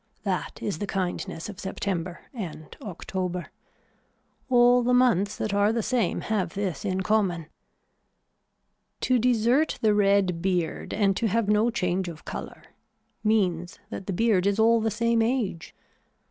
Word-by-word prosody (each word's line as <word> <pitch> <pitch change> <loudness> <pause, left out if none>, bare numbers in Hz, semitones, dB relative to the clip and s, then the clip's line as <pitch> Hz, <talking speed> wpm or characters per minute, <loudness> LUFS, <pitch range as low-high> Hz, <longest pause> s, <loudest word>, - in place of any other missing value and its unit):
That - - -3
is 205 - -2
the 205 - -3
kindness 180 -3 -3
of 205 -3 -9
September 185 -2 -3
and 170 - -7
October. 180 -2 -4 1.0
All 245 0 +5
the 250 +1 +2
months 215 -5 +3
that 215 - -3
are 205 +1 +3
the 230 -1 -1
same 240 -8 0
have 205 -6 -2
this 195 -3 -2
in 190 -2 -1
common. 185 -5 +1 1.6
To 255 -1 +2
desert 245 +5 +2
the 215 -1 +5
red 200 -4 +2
beard 180 -3 -1
and 200 -2 +2
to 230 - +1
have 225 +1 +1
no 210 +3 +3
change 180 -4 -1
of 160 -2 -11
color - - -7 0.6
means 185 -4 +1
that 190 - -6
the 195 - -1
beard 200 -2 +2
is 200 0 +1
all 225 +1 +4
the 225 - +1
same 230 +2 +1
age. 225 -8 -1
205 Hz, 145 wpm, -26 LUFS, 185-225 Hz, 1.6 s, All